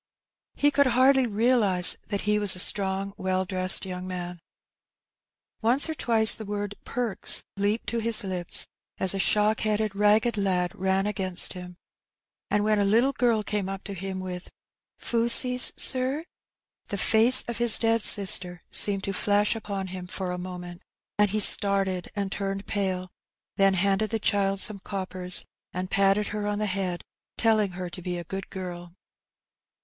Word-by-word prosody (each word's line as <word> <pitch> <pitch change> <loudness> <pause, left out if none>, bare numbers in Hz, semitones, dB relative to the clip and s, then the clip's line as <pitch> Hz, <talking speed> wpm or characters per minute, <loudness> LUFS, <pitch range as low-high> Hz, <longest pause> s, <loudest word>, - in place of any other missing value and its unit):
He 290 0 0
could 280 -1 +1
hardly 260 +1 +2
realize 210 -5 +3
that 200 -1 -4
he 210 0 -1
was 205 -3 +4
a - - -8
strong, 195 +1 0
well 185 0 -3
dressed 185 0 +4
young 185 -1 -8
man. 180 -1 -8 1.2
Once 245 +7 +2
or 320 - -4
twice 225 -6 +3
the 220 - -6
word 205 0 -6
^^ - - -44
Perks 240 -4 +2
" - - -67
leaped 205 +3 -3
to 235 - -4
his 230 -1 +4
lips 180 -3 0 0.3
as 190 0 +4
a 195 - -5
shock 210 +2 0
headed 215 -1 -2
ragged 210 +3 +1
lad 180 -3 -2
ran 190 +1 -2
against 190 -3 -1
him; 180 -1 -11 0.7
and 210 - -1
when 215 0 0
a - - +1
little 230 +7 +1
girl 235 -4 -1
came 205 -2 -4
up 195 0 -8
to 200 - -8
him 190 0 -7
with 180 -1 -9 0.3
" - - -55
Fusees, 240 +2 +4
sir? 260 +3 +4
'^ - - -16 0.6
the 200 - -6
face 230 +6 +5
of 235 -1 -7
his 235 -2 +6
dead 225 0 0
sister 180 -4 +4
seemed 195 -2 +3
to 195 - -5
flash 205 +3 -1
upon 200 -3 -6
him 185 -1 -9
for 185 0 -6
a 180 - -6
moment, 180 0 -10 0.4
and 210 -1 +2
he 215 +2 -3
started 195 -3 +2
and 200 -1 -5
turned 195 0 -5
pale, 185 -3 -4 0.5
then 195 -1 +2
handed 200 +3 -1
the 225 - -3
child 200 -2 -2
some 210 -1 +2
coppers, 185 -2 -1 0.3
and 185 +1 -6
patted 200 +1 0
her 210 0 -5
on 205 0 -3
the 215 - -3
head, 185 -3 -4 0.3
telling 215 -4 0
her 180 0 -7
to 175 +1 -10
be 180 0 -6
a 175 - -7
good 190 +3 -9
girl. 175 -2 -9
200 Hz, 175 wpm, -24 LUFS, 185-215 Hz, 1.2 s, his